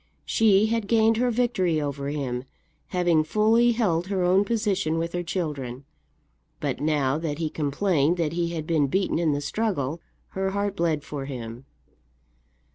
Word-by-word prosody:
She 215 -3 +4
had 225 -1 -1
gained 225 0 +3
her 250 +1 +2
victory 225 -9 +1
over 140 -1 -3
him, 130 -4 -3 0.4
having 175 -3 +2
fully 225 +7 +3
held 185 -7 0
her 190 -2 0
own 185 +3 +4
position 200 -7 0
with 165 +1 -2
her 175 - -1
children; 145 -7 -4 0.7
but - - -3
now 150 -2 +1
that 155 -3 -3
he 160 -2 -2
complained 155 +2 +1
that 165 -2 -1
he 170 0 0
had 165 -2 -4
been 155 -3 +2
beaten 190 +4 0
in 165 -3 +2
the 145 0 -1
struggle, 165 -5 -2 0.3
her 190 0 -2
heart 200 0 -2
bled 165 -4 0
for 145 -2 -5
him. 120 -2 -7
170 Hz, 160 wpm, -25 LUFS, 145-200 Hz, 0.7 s, She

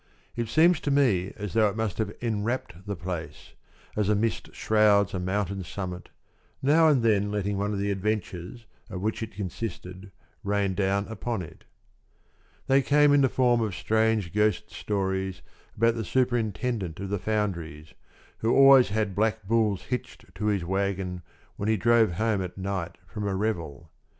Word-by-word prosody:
It 120 -1 -2
seems 160 +7 +4
to - - -3
me 120 -10 +2
as 105 -2 -5
though 110 -2 +4
it 100 - -6
must 110 -2 -2
have 110 - -1
enwrapped 110 -4 -3
the 100 - -2
place, 85 -3 -7 0.4
as 105 -1 0
a 105 - +4
mist 110 +2 -1
shrouds 105 -2 +3
a 95 - -2
mountain 95 +1 -2
summit, 90 0 -6 0.5
now 155 +4 +4
and 140 -6 +3
then 105 -3 +2
letting 100 -1 -2
one 100 +1 -1
of 105 - -2
the 100 +1 -1
adventures 100 +1 -3 0.2
of 95 -4 -5
which 110 +3 -2
it 110 -2 -6
consisted 95 -1 -6 0.3
rain 100 -1 0
down 100 +1 0
upon 110 -1 -3
it. 80 - -13 1.0
They 135 +1 +4
came 145 +1 +4
in 145 - +5
the 135 - +4
form 120 -2 +2
of 105 -5 -2
strange 110 -3 +1
ghost 105 0 +1
stories 95 -2 -2 0.3
about 115 +2 +3
the 115 -1 -3
superintendent 115 -6 -1
of 100 0 -5
the 100 0 -1
foundries, 85 -8 -3 0.5
who 115 - +1
always 135 -3 +7
had 105 -1 -1
black 110 +1 0
bulls 110 -3 +1
hitched 125 -1 -6
to 105 +4 -3
his 100 -5 0
wagon 95 -1 -2 0.4
when 100 - -2
he 110 - +3
drove 115 -1 +3
home 110 +2 0
at 90 0 -6
night 95 -2 -4
from 105 +2 -5
a 95 - -1
revel. 85 -7 -3
105 Hz, 170 wpm, -27 LUFS, 95-115 Hz, 1.0 s, always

